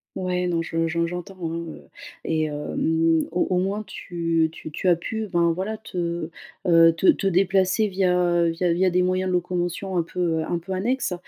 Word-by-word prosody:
Ouais, 180 -1 -1
non 170 -2 0
je 165 0 -1
je 170 +1 0
j'entends 180 +2 -6
hein, 165 -1 -3
heu, - - -10 0.4
et 160 -1 0
hem, 160 +2 0
au 180 - 0
au 180 - +1
moins 195 +3 -1
tu 165 -5 -1
tu 160 - -9
tu 155 +4 -3
as 175 - +6
pu 220 +6 -4
ben, 170 -2 +2
voilà 200 +5 -3
te, 170 -6 -4 0.4
heu, 165 -1 +6
te 190 - +1
te - - +4
déplacer 190 +2 +2
via, 185 -2 +1
heu, 175 -1 +2
via 170 +1 0
via 185 +1 +2
des 180 +1 +2
moyens 185 +1 0
de - - -1
locomotion 180 +2 -2
un 170 - +2
peu, 170 - -8 0.2
heu, - - -2
un 170 - -1
peu 190 +3 -6
annexes. 235 +1 -1
175 Hz, 200 wpm, -24 LUFS, 165-185 Hz, 0.4 s, as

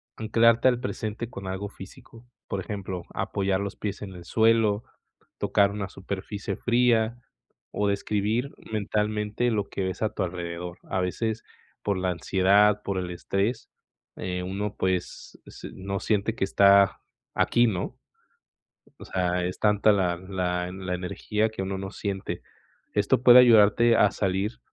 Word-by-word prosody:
anclarte 115 +2 +3
al 125 -2 +3
presente 115 -2 -4
con 100 -6 -8
algo 95 +2 -4
físico, 115 +4 -13 0.2
por 100 - -3
ejemplo, 95 -3 -5
apoyar 95 0 -1
los 100 0 -4
pies 100 -2 -5
en 95 -2 -7
el 90 -1 -11
suelo, 110 0 +3 0.6
tocar 100 -1 +3
una 100 -1 -4
superficie 100 +1 -5
fría 120 -1 +2 0.5
o 105 - 0
describir 105 +6 -1 0.2
mentalmente 105 +2 -1
lo 105 -3 -1
que 95 - -3
ves 95 +2 -3
a 110 - +2
tu 105 - -2
alrededor, 85 0 -5
a - - -3
veces, 110 +5 -2 0.4
por 100 -2 0
la 95 0 -1
ansiedad, 100 +4 +3
por 100 -1 -2
el 90 -1 -4
estrés, 100 +6 -2 0.5
eh, 90 0 -3
uno, 100 +2 -3
pues, 95 -1 -3
ese - - -10
no 100 +1 -4
siente 105 +2 0
que - - -2
está 100 0 +5 0.3
aquí, 120 0 +3
¿no?, 90 -5 -3 1.0
o - - -10
sea, 90 -1 -1
es 90 - -4
tanta 105 0 +4
la 90 -3 +1
la 90 -1 -2
la 95 -1 -5
energía 105 +4 -1
que 110 -3 -6
uno 95 0 -3
no 95 0 -6
siente, 100 -2 -4 0.5
esto 125 - +2
puede 125 0 +9
ayudarte 115 -1 +6
a 105 - +4
salir 95 +3 -2
100 Hz, 150 wpm, -26 LUFS, 95-110 Hz, 1.0 s, puede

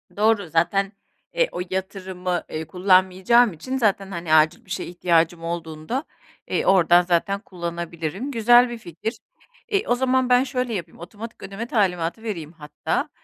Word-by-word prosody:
Doğru 210 -4 +2
zaten, 195 +5 +1 0.4
eee, - - +2
o - - -4
yatırımı, 185 -2 -3
eee, 155 0 -5
kullanmayacağım 190 +5 +4
için 255 +12 -4
zaten, 200 -5 +1
hani, 170 -3 -2
acil 155 0 +4
bir - - -22
şeye 170 - -3
ihtiyacım 170 -1 +1
olduğunda, 165 - -4 0.4
eee, - - -1
oradan 175 -2 +5
zaten 180 +3 0
kullanabilirim. 170 - -5
Güzel 240 +1 +5
bir 240 - -5
fikir. 185 +3 -6 0.5
E, 410 -1 0
o 245 - +3
zaman 260 0 +1
ben 250 +1 +5
şöyle 250 -3 -2
yapayım 170 -5 -6
otomatik 210 +6 -9
ödeme 200 +4 -5
talimatı 185 -2 0
vereyim 170 -9 -5
hatta. 150 -3 -3
190 Hz, 150 wpm, -23 LUFS, 170-230 Hz, 0.5 s, oradan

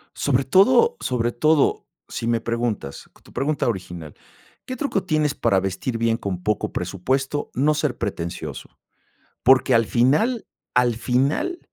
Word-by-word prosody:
Sobre 140 -1 +1
todo 245 - +4
sobre 120 -1 -1
todo, 155 +4 +2 0.2
si 115 - -4
me 115 -1 +1
preguntas 115 - -3
tu - - -18
pregunta 145 +1 -1
original, 90 -5 -5 0.5
¿qué 255 - -5
truco 255 -10 -1
tienes, 155 -4 +1
para 95 - +2
vestir 95 +6 -3
bien 115 0 +1
con 90 -5 -5
poco 105 -2 -1
presupuesto? 130 - -2
No 145 +4 +2
ser 150 -3 -1
pretencioso, 85 -6 -5 0.7
porque, 130 0 +5
al 115 -1 +4
final 150 - +2 0.3
al 125 -2 +3
final 135 - 0
125 Hz, 140 wpm, -22 LUFS, 115-150 Hz, 0.7 s, porque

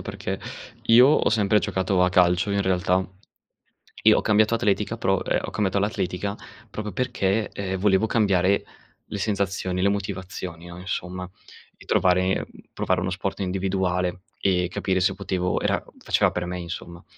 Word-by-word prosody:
perché - - -5 0.4
io 125 +4 +7
ho 150 - +3
sempre 105 -1 +3
giocato 95 -2 0
a 90 - +4
calcio 90 +1 +3
in 100 0 +1
realtà. 90 0 +1 1.0
E - - +7
ho - - +4
cambiato 110 +1 +3
atletica 110 0 0
pro 95 -3 +1
ehm, - - +1
ho - - -4
cambiato 100 -2 -1
all'atletica 100 0 -1 0.3
proprio 105 +1 -5
perché, 110 -3 0
ehm, 95 -1 -3
volevo 95 +1 +3
cambiare 100 -3 +2 0.4
le 105 - -5
sensazioni, 95 -3 -1
le 100 - +3
motivazioni, 95 -3 -4
no, 85 0 -9
insomma, 90 -1 -5 0.5
di - - -16
trovare 95 +1 +3
mhmm, - - -4 0.3
provare - - 0
uno 90 - -1
sport 95 +1 -3
individuale 90 -1 -1 0.2
e 90 -2 +2
capire 95 0 -1
se 90 - +2
potevo 90 -1 -1
era - - +1 0.2
faceva - - +2
per 90 - -2
me 90 0 -4
insomma. 85 0 -7
95 Hz, 155 wpm, -24 LUFS, 90-100 Hz, 1.0 s, io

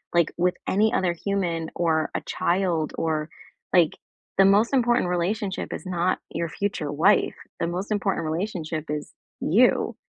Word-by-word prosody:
like, 170 -2 +3
with 180 +1 +2
any 215 +3 +3
other 180 -2 +1
human 170 -3 -2
or 160 -2 +1
a - - -1
child? 170 -3 0
Or, 155 -1 -1 0.4
like 175 -4 +5 0.5
the 195 - +8
most 205 +5 +4
important 240 -6 +3
relationship 190 +3 -2
is - - -6
not 180 0 0
your 170 +1 -2
future 180 -7 -2
wife: 145 +3 +3 0.2
the 170 - 0
most 185 +5 -4
important 195 -5 0
relationship 160 -2 -3
is 150 -1 -4 0.3
you. - - +3
175 Hz, 150 wpm, -25 LUFS, 160-195 Hz, 0.5 s, the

